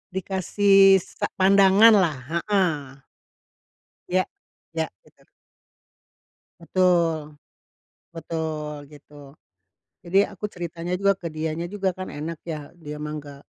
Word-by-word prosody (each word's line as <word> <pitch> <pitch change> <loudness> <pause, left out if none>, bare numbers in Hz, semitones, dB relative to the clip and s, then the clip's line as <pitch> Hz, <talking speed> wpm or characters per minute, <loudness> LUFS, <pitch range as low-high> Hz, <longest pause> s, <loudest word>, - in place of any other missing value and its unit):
Dikasih 195 +1 +4
sa - - -4
pandanganlah, 195 -3 +5
heeh. 165 -8 -1 1.1
Ya, 185 +1 +2 0.5
ya, 160 -1 -2 0.2
betul. - - -26 1.3
Betul. 165 -4 +1 0.7
Betul 155 -2 -5
gitu. 145 -1 -15 0.7
Jadi 180 +2 -1
aku 205 +1 -7
ceritanya 175 0 -5
juga 200 +1 +3
ke 180 -3 -7
dianya 160 +2 -3
juga, 195 -2 -1
kan, 185 +1 -7
enak, 155 +2 -6
ya, 150 -3 -6
dia 150 -3 -9
mah 150 0 -4
nggak 140 -1 -12
170 Hz, 100 wpm, -24 LUFS, 150-190 Hz, 1.3 s, pandanganlah